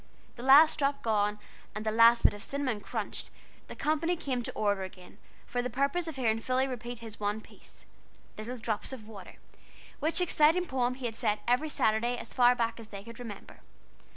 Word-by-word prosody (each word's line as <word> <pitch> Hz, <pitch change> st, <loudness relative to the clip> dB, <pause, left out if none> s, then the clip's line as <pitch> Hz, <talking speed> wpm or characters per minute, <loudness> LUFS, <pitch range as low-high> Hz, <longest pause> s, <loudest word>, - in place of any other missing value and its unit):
The 235 Hz, -, -9 dB
last 285 Hz, +5 st, +7 dB
drop 280 Hz, 0 st, 0 dB
gone, 210 Hz, -2 st, +1 dB, 0.4 s
and 215 Hz, +1 st, -5 dB
the 215 Hz, -, +1 dB
last 230 Hz, +1 st, +6 dB
bit -, -, +5 dB
of 205 Hz, -, -9 dB
cinnamon 260 Hz, -4 st, -2 dB
crunched, -, -, -4 dB, 0.4 s
the -, -, -9 dB
company 315 Hz, +3 st, 0 dB
came 260 Hz, -6 st, -2 dB
to -, -, -3 dB
order 205 Hz, -2 st, 0 dB
again, 185 Hz, -1 st, -10 dB, 0.3 s
for 245 Hz, -, -2 dB
the 250 Hz, -, -3 dB
purpose 280 Hz, +7 st, 0 dB
of 320 Hz, -, -5 dB
hearing 225 Hz, -4 st, +1 dB
Philly 255 Hz, +3 st, 0 dB
repeat 245 Hz, -1 st, -6 dB
his 225 Hz, -1 st, -10 dB
one 205 Hz, +1 st, -1 dB
piece, -, -, -17 dB, 0.5 s
"Little 235 Hz, +4 st, -6 dB
drops 220 Hz, 0 st, -3 dB
of 230 Hz, -5 st, -8 dB
water," 200 Hz, -4 st, -11 dB, 0.6 s
which 315 Hz, +4 st, +1 dB
exciting 350 Hz, 0 st, +3 dB
poem 255 Hz, -4 st, -1 dB
he 260 Hz, -1 st, -7 dB
had 225 Hz, -2 st, -3 dB
said 215 Hz, -3 st, 0 dB
every 250 Hz, +6 st, +2 dB
Saturday 235 Hz, -1 st, +1 dB
as 235 Hz, -, -5 dB
far 245 Hz, 0 st, +5 dB
back 230 Hz, -1 st, -1 dB
as 225 Hz, -, -10 dB
they 200 Hz, -2 st, -9 dB
could 230 Hz, +1 st, -11 dB
remember. 230 Hz, -5 st, -9 dB
240 Hz, 195 wpm, -30 LUFS, 215-270 Hz, 0.6 s, last